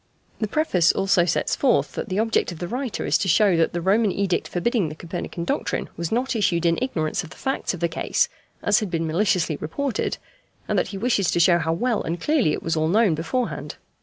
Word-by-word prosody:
The 215 - 0
preface 200 - +2
also 195 -2 +2
sets 170 - 0
forth 265 -3 +2
that - - -5
the 185 - -2
object 225 -3 +1
of 170 - -8
the 175 - -4
writer 250 +3 -3
is - - +2
to 195 - -1
show 195 +1 +4
that 165 - +2
the 175 - -3
Roman 205 +3 +3
edict 195 -2 -1
forbidding 190 -1 0
the 155 - -8
Copernican 170 +1 -5
doctrine - - -2
was 170 -1 -4
not 250 +2 0
issued 175 -6 +1
in 165 0 +2
ignorance 185 -7 -1
of 165 - -10
the - - -13
facts 270 -7 -2
of 175 - -11
the 170 - +3
case, 165 - 0 0.4
as 205 0 +4
had 210 - -3
been 165 -1 -1
maliciously 170 -2 +1
reported, 255 - -2 0.5
and - - +1
that - - 0
he 195 - -6
wishes 205 -3 +1
to - - +1
show 170 0 +5
how 160 0 0
well 235 +6 0
and 170 +2 -3
clearly 290 - +2
it - - -3
was 165 - 0
all 155 0 +1
known 205 +1 +3
beforehand. 165 +11 -3
185 Hz, 225 wpm, -23 LUFS, 165-225 Hz, 0.5 s, show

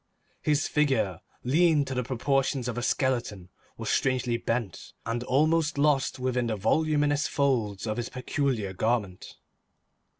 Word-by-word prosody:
His 150 0 +1
figure, 135 - +1 0.2
lean 150 +2 +3
to 135 - -4
the 125 - 0
proportions 135 +1 0
of 125 - -3
a 120 - -2
skeleton, 120 -8 -1 0.3
was - - -3
strangely 130 -3 +1
bent 115 -4 -3
and 120 +1 -2
almost 155 +3 +2
lost 145 -1 +2
within 125 -1 -1
the 110 - -1
voluminous 145 +6 +1
folds 115 -9 0
of 110 0 -2
his 120 -1 -3
peculiar 125 -6 -2
garment. 105 -3 -2
125 Hz, 135 wpm, -27 LUFS, 115-145 Hz, 0.3 s, lean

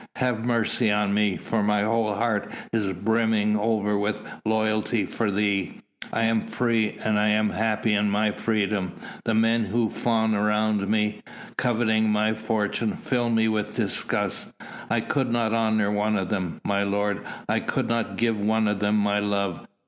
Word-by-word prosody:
Have 125 -4 -1
mercy 115 -1 +1
on 105 -1 +1
me, 105 -2 +2
for 115 - -1
my 105 0 +2
whole 110 -1 +1
heart 110 -1 -1 0.2
is 105 -4 0
brimming 110 +2 +1
over 105 -1 +1
with 105 +1 -1 0.3
loyalty 110 -1 +1
for 110 +3 -2
thee! 100 -2 0 0.3
I 115 - 0
am 115 -1 +1
free, 115 -3 0
and 110 -1 +2
am 105 0 +2
happy 110 +2 0
in 105 0 +2
my 105 +1 +1
freedom; 100 -4 -1 0.3
the 115 - +1
men 115 0 +3
who 110 +3 0
fawn 110 -2 +1
round 105 -1 +1
me, 105 -1 0 0.3
coveting 110 -3 +1
my 105 +1 +2
fortune, 110 0 -1
fill 120 -2 -1
me 110 -1 +2
with 105 -1 -1
disgust. - - -1 0.4
I - - +1
could 135 -3 -1
not 115 -2 +1
honour 110 -2 +2
one 105 +1 +1
of 95 -3 -1
them, 95 -5 -3
my 100 0 +1
lord! 100 0 0 0.3
I - - +1
could - - -2
not 115 -1 -1
give 115 -3 +1
one 110 +1 +2
of 105 -1 0
them 105 +1 +2
my 105 0 +2
love. 100 -4 -2
110 Hz, 165 wpm, -25 LUFS, 105-110 Hz, 0.4 s, men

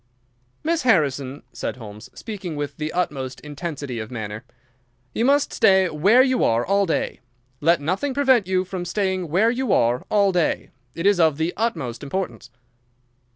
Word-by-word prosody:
"Miss 330 +1 +1
Harrison," 145 - +1
said - - -4
Holmes, 105 -2 -10
speaking 195 -7 -6
with 145 -1 -4
the 155 0 -3
utmost 135 -8 -2
intensity 145 -4 -5
of 110 0 -6
manner, 110 -2 -6 0.7
"you 230 - 0
must 280 +3 +3
stay 190 -4 +4
where 200 +12 +5
you 260 -1 +1
are 115 +1 +2
all 200 0 +2
day. 165 - -1 0.4
Let 170 +3 +3
nothing 190 - -2
prevent 260 -8 +3
you 185 0 +1
from 185 -1 -5
staying 185 0 -1
where 200 +9 +3
you 250 -2 -1
are 120 +1 +2
all 200 -2 +3
day. 175 -3 0 0.2
It 165 +3 -4
is 200 -2 +4
of 160 -4 +4
the 160 +2 -1
utmost 160 - -2
importance." 145 -3 -4
175 Hz, 160 wpm, -23 LUFS, 140-205 Hz, 0.7 s, where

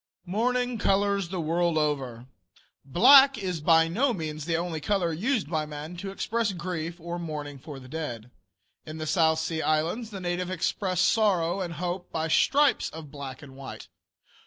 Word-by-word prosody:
MOURNING 245 +5 0
COLORS 200 -2 +1
THE 185 0 -3
WORLD 170 +1 +1
OVER. 135 -6 -1 0.6
Black 265 - +7
is 180 -5 -3
by 165 +1 +5
no 240 +10 +1
means 155 -4 -5
the 165 -1 0
only 170 -2 -3
color 180 -1 0
used 220 - 0
by 155 -1 -2
man 150 +3 -7
to 195 +2 -5
express 220 +2 -1
grief 170 -1 -4
or 170 +1 -5
mourning 150 -4 -6
for 140 0 -9
the 130 - -13
dead. 125 -6 -6 0.5
In 155 +1 -8
the 155 - -4
South 160 0 +3
Sea 160 0 -2
Islands 165 +10 0
the 200 -3 -7
natives 180 0 -2
express 185 0 -1
sorrow 185 -3 +2
and 175 -2 -4
hope 180 +2 -4
by 160 0 -2
stripes 285 - +3
of 155 -3 -10
black 140 -3 -8
and 135 -2 -12
white. 135 -1 -9
170 Hz, 170 wpm, -27 LUFS, 155-195 Hz, 0.6 s, Black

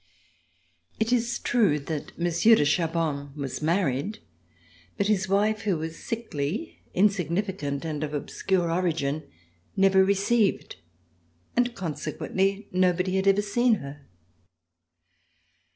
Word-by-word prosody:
It 220 +2 +1
is 240 0 +1
true 210 -11 +2
that 150 +1 -6
Monsieur 175 +6 +4
de 150 - +2
Chaban 150 -3 -1
was 140 -2 -5
married, 170 - 0 0.8
but 200 - +1
his 195 -2 +1
wife 210 +2 +2
who 200 -6 0
was 160 +1 -5
sickly, 220 - -4 0.2
insignificant 180 -6 0
and 155 -2 -3
of 150 - -3
obscure 175 +4 -1
origin, 160 -4 -1 0.5
never 195 0 +5
received, 200 +2 +1 0.8
and 245 0 +1
consequently 190 +4 -2
no 180 -1 +3
body 185 +2 -1
had 190 +1 0
ever 195 +1 +4
seen 235 +3 +2
her. 140 -4 -9
185 Hz, 115 wpm, -26 LUFS, 155-205 Hz, 0.8 s, never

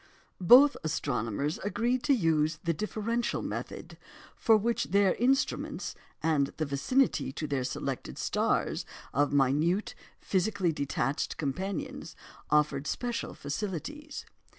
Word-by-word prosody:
Both 255 +9 +8
astronomers 140 - -1
agreed 235 +5 0
to 285 - +4
use 160 -6 +1
the 170 -1 +1
"differential" 225 +6 -2
method, - - -6 0.4
for 225 -1 +4
which 230 +3 0
their 200 0 +3
instruments 265 +4 0 0.3
and 150 -4 +2
the 155 - 0
vicinity 140 - +1
to 155 - -4
their 140 -3 -1
selected - - -4
stars - - 0 0.3
of 145 +2 +2
minute, 145 +8 +2 0.3
physically 190 -2 0
detached 140 -2 -2
companions 185 +6 -4 0.3
offered 150 -1 +2
special 240 +6 -3
facilities. 210 - -5
170 Hz, 110 wpm, -29 LUFS, 145-225 Hz, 0.4 s, Both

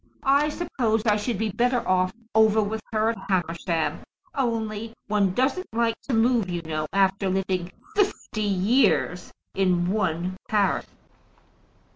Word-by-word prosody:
I 280 +2 +3
suppose 240 -9 -1
I 210 -2 +4
should 215 +1 -2
be 220 +1 -1
better 245 +4 +1
off 185 0 +2 0.2
over 220 0 +5
with 215 +1 -1
her 220 0 +2
at 230 - -7
Hamersham, 170 -2 -1 0.3
only 225 -3 -2
one 205 -3 +2
doesn't 270 +9 0
like 230 0 +2 0.2
to 250 - +2
move, 225 -3 +2
you 175 -1 -3
know, 155 -1 -3
after 195 0 +2
living 185 -1 -1 0.2
fifty 390 - 0
years 200 -1 +2 0.2
in 180 -2 +1
one 185 -3 -1
parish." 205 -3 +1
210 Hz, 135 wpm, -25 LUFS, 185-230 Hz, 0.3 s, over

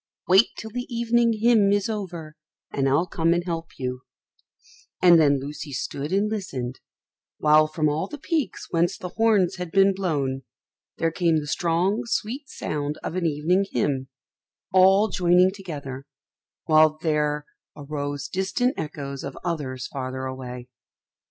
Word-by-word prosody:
Wait 190 +5 +6
till 220 - -7
the 245 +3 -4
evening 235 0 +2
hymn 220 -4 +5
is 205 -1 +1
over, 175 -8 -5 0.4
and 135 -1 +1
I'll 145 +6 +3
come 165 -1 +1
and 175 - 0
help 165 -2 -5
you;" 125 -1 -4 1.0
and 175 -2 +7
then 140 -2 +4
Lucy 145 +2 -7
stood 140 +3 -4
and 200 +2 +2
listened, 135 - -4 0.6
while 155 0 +5
from 155 0 0
all 150 +5 -1
the 295 - -8
peaks 310 0 -2
whence 175 +3 +1
the 180 - -6
horns 200 -3 +2
had 180 -1 -5
been 195 +1 +5
blown 145 -9 -1 0.6
there 165 0 +1
came 170 -1 +2
the 150 - -2
strong 175 +7 0
sweet 240 +5 -3
sound 150 0 -3
of 165 - -4
an 180 -2 +1
evening 160 +6 +1
hymn, 135 -2 0 0.7
all 190 +3 +6
joining 180 -1 +4
together, 140 -9 -7 0.6
while 155 -1 +5
there 150 -2 0 0.3
arose 145 -1 -4
distant 195 +7 0
echoes 140 -3 -5
of 140 - -6
others 145 -8 -3
farther 130 -1 -5
away. 125 -1 -7
165 Hz, 145 wpm, -24 LUFS, 145-195 Hz, 1.0 s, and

